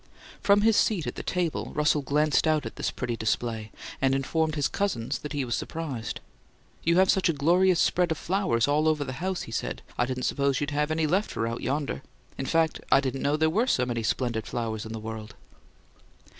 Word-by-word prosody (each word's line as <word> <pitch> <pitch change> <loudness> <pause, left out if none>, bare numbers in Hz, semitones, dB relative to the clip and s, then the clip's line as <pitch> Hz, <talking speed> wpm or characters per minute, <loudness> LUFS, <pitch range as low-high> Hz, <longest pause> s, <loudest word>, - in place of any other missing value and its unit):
From 200 0 +5
his 220 0 +4
seat 190 -8 +2
at - - -3
the - - -6
table, 175 -3 -2
Russell 150 0 +3
glanced 150 +3 +2
out 155 -3 +2
at - - -6
this - - -1
pretty 125 -2 -3
display, 110 -1 -2 0.3
and 135 0 +3
informed 155 +4 0
his 145 -2 +1
cousins 195 - -2
that 150 - -6
he 140 -2 -1
was 120 - -3
surprised. 140 -9 -4 0.6
"You 170 +1 +3
have 190 0 +6
such 190 -2 +2
a - - +3
glorious 175 +5 +3
spread 180 -1 +2
of 160 - 0
flowers 175 - +1
all 150 +2 +2
over 155 -2 +2
the 130 - -5
house," 190 0 -1
he - - -9
said, - - -3 0.2
"I 120 - +3
didn't 130 0 -3
suppose 140 -1 +1
you'd 145 0 -2
have 150 +1 0
any 160 0 +1
left 190 +7 0
out 115 +1 -2
yonder. 140 +1 -2 0.3
In 135 - -4
fact, 165 +2 +1
I - - +7
didn't 135 -1 -2
know 145 +2 +1
there 160 0 +3
were 225 +8 +2
so 125 - +2
many 120 -2 -2
splendid 115 -1 -1
flowers 110 -2 -3
in - - -8
the 110 - -5
world." 110 0 -7
145 Hz, 210 wpm, -27 LUFS, 120-165 Hz, 0.6 s, I